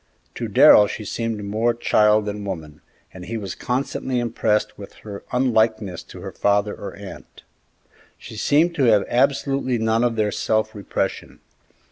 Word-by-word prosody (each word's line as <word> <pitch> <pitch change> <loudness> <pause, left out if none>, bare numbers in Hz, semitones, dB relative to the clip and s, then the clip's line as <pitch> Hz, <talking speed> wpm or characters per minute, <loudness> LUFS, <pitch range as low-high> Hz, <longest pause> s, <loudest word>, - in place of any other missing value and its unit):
To - - -4
Darrell 105 - +7
she 105 +1 -6
seemed 115 0 -3
more 110 +4 0
child 105 -2 +3
than 105 0 -5
woman, 80 -6 -7 0.3
and 90 - -10
he 115 +5 -4
was 100 -4 -5
constantly 130 0 -3
impressed 115 -2 0
with 100 - -11
her 100 -2 -8
unlikeness 110 -7 +1
to - - -12
her - - -7
father 100 0 +1
or 100 - -8
aunt. 100 -1 -12 0.7
She - - -11
seemed 155 +9 +2
to 135 - +3
have 105 -4 +4
absolutely 135 0 +1
none 110 +1 +1
of 120 -2 +1
their 105 -1 0
self 110 +1 -1
repression. 100 -2 -4
110 Hz, 155 wpm, -22 LUFS, 105-120 Hz, 0.7 s, Darrell